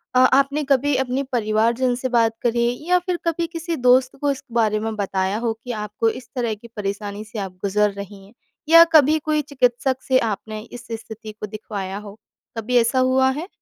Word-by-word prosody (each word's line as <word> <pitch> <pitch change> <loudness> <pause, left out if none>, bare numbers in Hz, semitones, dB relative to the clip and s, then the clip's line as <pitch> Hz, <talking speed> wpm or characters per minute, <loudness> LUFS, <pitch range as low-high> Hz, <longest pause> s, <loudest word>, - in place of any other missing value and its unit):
अ, - - +6
आपने 275 +3 +3
कभी 280 0 +2
अपने 265 +1 -1
परिवारजन 235 +2 +1
से 255 +1 -3
बात 230 -2 +2
करी, 235 0 +2 0.2
या 360 0 +5
फिर 360 0 -2
कभी 335 0 0
किसी 335 0 -4
दोस्त 255 -1 +3
को 285 -1 +2
इस 275 - -6
बारे 220 -2 +1
में 220 0 -3
बताया 195 0 -1
हो 230 -1 -1
कि 245 - -5
आपको 210 +2 0
इस 245 +1 -8
तरह 235 -3 -1
की 215 +3 -14
परेशानी 205 +1 -4
से 215 +1 -7
आप 190 -2 -6
गुज़र 205 +1 +1
रही 200 0 -9
हैं? 200 - -19 0.4
या 330 +1 +10
कभी 310 0 +6
कोई 305 -1 +1
चिकित्सक 260 -2 0
से 260 - +4
आपने 215 -1 -3
इस 240 +2 -11
स्थिति 220 -1 -7
को 210 - -7
दिखवाया 200 -2 -6
हो, 205 +1 -10 0.4
कभी 240 +3 0
ऐसा 235 +3 +2
हुआ 260 +1 +3
है? 305 +6 -5
235 Hz, 200 wpm, -22 LUFS, 215-265 Hz, 0.4 s, या